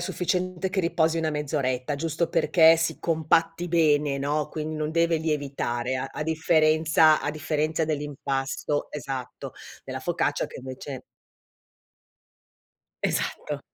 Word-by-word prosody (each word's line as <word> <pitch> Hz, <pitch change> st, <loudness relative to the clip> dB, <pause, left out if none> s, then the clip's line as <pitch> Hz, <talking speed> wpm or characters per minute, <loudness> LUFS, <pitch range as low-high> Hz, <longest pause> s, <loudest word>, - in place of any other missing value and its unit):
sufficiente 185 Hz, +1 st, -1 dB
che 190 Hz, +1 st, 0 dB
riposi 165 Hz, -1 st, +1 dB
1 160 Hz, -1 st, 0 dB
mezz'oretta, 145 Hz, -3 st, -1 dB
giusto 160 Hz, +3 st, -1 dB
perché 165 Hz, 0 st, +5 dB
si 165 Hz, 0 st, -1 dB
compatti 165 Hz, +1 st, +1 dB
bene, 150 Hz, -4 st, +2 dB
no, 145 Hz, +2 st, -1 dB
quindi 155 Hz, 0 st, -4 dB
non 155 Hz, 0 st, -2 dB
deve 165 Hz, 0 st, +2 dB
lievitare, 140 Hz, -5 st, -2 dB
a 130 Hz, +1 st, -2 dB
a 155 Hz, -, -4 dB
differenza 160 Hz, 0 st, +4 dB
a 145 Hz, -, -1 dB
differenza 155 Hz, +1 st, -1 dB
dell'impasto, 145 Hz, -1 st, -2 dB
esatto, 135 Hz, -3 st, -6 dB, 0.3 s
della -, -, -5 dB
focaccia -, -, 0 dB
che -, -, -10 dB
invece 130 Hz, 0 st, -7 dB, 2.0 s
Esatto. -, -, -2 dB
155 Hz, 120 wpm, -26 LUFS, 145-165 Hz, 2.0 s, perché